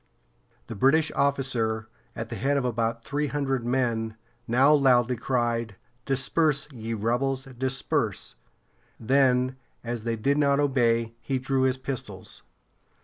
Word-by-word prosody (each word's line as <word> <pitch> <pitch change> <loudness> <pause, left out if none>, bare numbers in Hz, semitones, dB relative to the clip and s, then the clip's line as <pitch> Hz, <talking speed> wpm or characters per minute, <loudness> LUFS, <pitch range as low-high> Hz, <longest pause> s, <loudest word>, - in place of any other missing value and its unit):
The 115 - -7
British 140 +8 +3
officer, 125 -6 0 0.3
at 115 0 -5
the 115 - -5
head 140 +4 0
of 135 - 0
about 115 -1 -1
three 150 +1 -1
hundred 135 -3 -1
men, 115 -3 -1 0.3
now 130 +5 +5
loudly 125 -4 +4
cried: 120 -3 -1 0.3
"Disperse, 140 +2 +1
ye 115 -3 -5
rebels! 130 +5 -1
Disperse!" 130 +2 -2 0.7
Then, 130 +1 +2 0.3
as 120 -1 -4
they 115 0 -1
did 140 +6 +1
not 140 -1 +3
obey, 115 -5 +2
he 135 - -1
drew 130 +1 0
his 130 0 +2
pistols. 130 -1 -6
130 Hz, 130 wpm, -26 LUFS, 115-135 Hz, 0.7 s, now